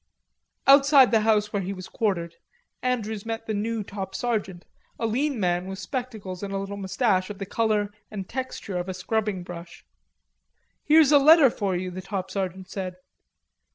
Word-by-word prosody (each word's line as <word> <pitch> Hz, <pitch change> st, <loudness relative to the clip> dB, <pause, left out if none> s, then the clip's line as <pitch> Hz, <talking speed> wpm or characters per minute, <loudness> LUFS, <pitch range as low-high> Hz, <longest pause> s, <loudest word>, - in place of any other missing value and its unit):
Outside 275 Hz, -1 st, +7 dB
the 225 Hz, -2 st, +4 dB
house 210 Hz, -1 st, +2 dB
where 200 Hz, -, 0 dB
he 190 Hz, +1 st, -3 dB
was 185 Hz, -1 st, -8 dB
quartered 180 Hz, -7 st, -1 dB, 0.5 s
Andrews 220 Hz, -5 st, -2 dB
met 225 Hz, 0 st, -4 dB
the 220 Hz, -, -2 dB
new 220 Hz, +1 st, -2 dB
top 195 Hz, -1 st, -6 dB
sergeant, 195 Hz, -6 st, -2 dB, 0.3 s
a 230 Hz, -, -1 dB
lean 260 Hz, +3 st, 0 dB
man 180 Hz, -1 st, 0 dB
with 190 Hz, 0 st, -5 dB
spectacles 210 Hz, -4 st, -5 dB
and 200 Hz, -1 st, -5 dB
a 195 Hz, -, -2 dB
little 195 Hz, +1 st, -4 dB
mustache 195 Hz, -1 st, 0 dB
of 205 Hz, -, -6 dB
the 195 Hz, -, -5 dB
color 210 Hz, 0 st, 0 dB, 0.2 s
and 195 Hz, -3 st, -6 dB
texture 255 Hz, -7 st, -4 dB
of 175 Hz, +2 st, -4 dB
a 185 Hz, -, -4 dB
scrubbing 205 Hz, 0 st, -1 dB
brush. 175 Hz, -1 st, -10 dB, 1.0 s
"Here's 305 Hz, -1 st, +6 dB
a 290 Hz, -, +8 dB
letter 300 Hz, -2 st, +7 dB
for 195 Hz, -5 st, -1 dB
you," 180 Hz, +1 st, -3 dB
the 185 Hz, +1 st, -6 dB
top 190 Hz, -1 st, -4 dB
sergeant 190 Hz, -1 st, -3 dB
said. 185 Hz, -1 st, -5 dB
205 Hz, 175 wpm, -25 LUFS, 185-230 Hz, 1.0 s, a